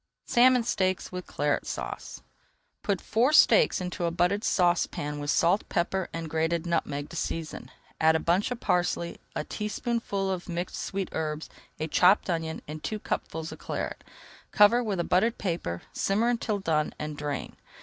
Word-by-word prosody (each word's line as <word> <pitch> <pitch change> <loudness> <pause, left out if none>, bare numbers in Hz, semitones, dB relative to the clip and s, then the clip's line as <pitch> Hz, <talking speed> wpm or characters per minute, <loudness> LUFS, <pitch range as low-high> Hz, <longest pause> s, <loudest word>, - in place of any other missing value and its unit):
SALMON 250 0 +5
STEAKS 185 -5 0
WITH 180 0 -6
CLARET 145 0 -1
SAUCE - - -6 0.6
Put 200 -4 0
four 240 +6 +2
steaks 475 +9 +6
into 180 -1 -3
a - - +2
buttered 180 +5 +1
saucepan 175 -5 +1
with 145 0 -4
salt, 175 +6 +2
pepper, 185 +2 0
and 165 -1 -4
grated 160 +2 0
nutmeg 145 -4 -1
to - - -9
season, 165 -1 -4 0.3
add 160 0 +5
a - - +3
bunch 175 +5 +1
of 250 -1 -4
parsley, 175 -3 0 0.2
a - - -1
teaspoonful 210 -2 -2
of 185 -1 -4
mixed 175 +1 -3
sweet 195 -1 -3
herbs, 155 -1 -3 0.3
a 155 - -1
chopped 180 +4 +4
onion, 160 -1 -3
and 155 +1 -7
two 215 - -2
cupfuls 160 -5 -4
of - - -9
Claret. - - -4 0.5
Cover 225 +4 +6
with 205 -5 -2
a - - +2
buttered 225 +8 +2
paper, 165 - -3
simmer 215 +5 +1
until 230 -3 0
done, 155 -5 0
and 150 0 -4
drain. 145 -2 -4
175 Hz, 165 wpm, -28 LUFS, 160-205 Hz, 0.6 s, steaks